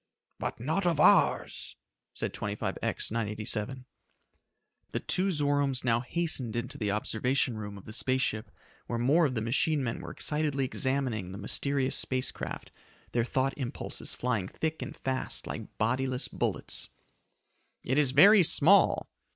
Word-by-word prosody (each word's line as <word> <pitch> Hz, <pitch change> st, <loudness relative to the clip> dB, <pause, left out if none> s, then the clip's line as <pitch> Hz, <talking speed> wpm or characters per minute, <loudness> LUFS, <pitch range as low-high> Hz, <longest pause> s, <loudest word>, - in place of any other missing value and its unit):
"But -, -, -3 dB
not 160 Hz, -, 0 dB
of 165 Hz, -4 st, +1 dB
ours," -, -, +3 dB, 0.4 s
said -, -, -3 dB
25X 105 Hz, 0 st, -2 dB
987. 105 Hz, -1 st, -1 dB
Together, 130 Hz, -1 st, -9 dB, 1.0 s
the -, -, -2 dB
two 190 Hz, +2 st, 0 dB
Zoromes 145 Hz, -5 st, +1 dB
now 115 Hz, -2 st, +2 dB
hastened 130 Hz, -3 st, -2 dB
into 120 Hz, +1 st, -3 dB
the 105 Hz, -3 st, -1 dB
observation 120 Hz, +4 st, 0 dB
room 105 Hz, -2 st, -6 dB
of 100 Hz, -, -13 dB
the 110 Hz, -, -8 dB
space 130 Hz, +3 st, 0 dB
ship 110 Hz, 0 st, -2 dB, 0.4 s
where 120 Hz, -, -2 dB
more 145 Hz, +8 st, +4 dB
of 130 Hz, -, -4 dB
the 110 Hz, -, -1 dB
machine 140 Hz, +5 st, +1 dB
men 115 Hz, -2 st, -2 dB
were -, -, -7 dB
excitedly 150 Hz, -3 st, 0 dB
examining 130 Hz, -8 st, -1 dB
the 95 Hz, -, -7 dB
mysterious 135 Hz, +6 st, 0 dB
space 130 Hz, 0 st, +1 dB
craft, -, -, -7 dB, 0.4 s
their 120 Hz, -, +1 dB
thought 130 Hz, +2 st, 0 dB
impulses 125 Hz, -3 st, -4 dB
flying 115 Hz, -7 st, -1 dB
thick 160 Hz, +8 st, -3 dB
and -, -, -6 dB
fast 130 Hz, -1 st, -3 dB
like -, -, -7 dB
bodiless 125 Hz, +3 st, 0 dB
bullets. -, -, -3 dB, 0.9 s
"It 130 Hz, +4 st, +1 dB
is 145 Hz, -3 st, +4 dB
very 195 Hz, +10 st, +8 dB
small!" 175 Hz, +4 st, +5 dB
130 Hz, 150 wpm, -29 LUFS, 115-145 Hz, 1.0 s, very